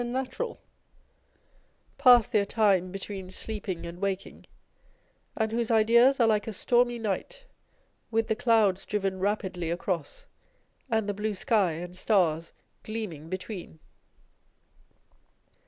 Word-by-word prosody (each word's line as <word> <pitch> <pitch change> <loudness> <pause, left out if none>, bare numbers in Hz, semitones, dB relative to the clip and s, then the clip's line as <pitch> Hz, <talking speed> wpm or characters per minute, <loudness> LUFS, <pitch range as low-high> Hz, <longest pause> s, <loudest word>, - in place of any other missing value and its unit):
natural, 260 - -3 1.4
pass 245 -4 +7
their 210 - +2
time 200 -4 +2
between 195 -1 -6
sleeping 190 -2 -5
and 170 +1 -8
waking, 195 -1 -4 0.9
and 220 -1 0
whose 230 0 -1
ideas 235 +4 +5
are 235 - +5
like 215 -1 +1
a 220 - -3
stormy 240 +4 +2
night, 230 - -4 0.6
with 225 0 +1
the 220 - 0
clouds 220 -5 +3
driven 195 -2 -2
rapidly 190 -4 -2
across, 170 -2 -3 0.6
and 220 -3 0
the 205 - -1
blue 210 +1 -2
sky 200 -5 +2
and 175 +3 -7
stars 170 -5 +1 0.3
gleaming 195 -9 -6
between 185 -2 -6
210 Hz, 115 wpm, -28 LUFS, 185-225 Hz, 1.4 s, pass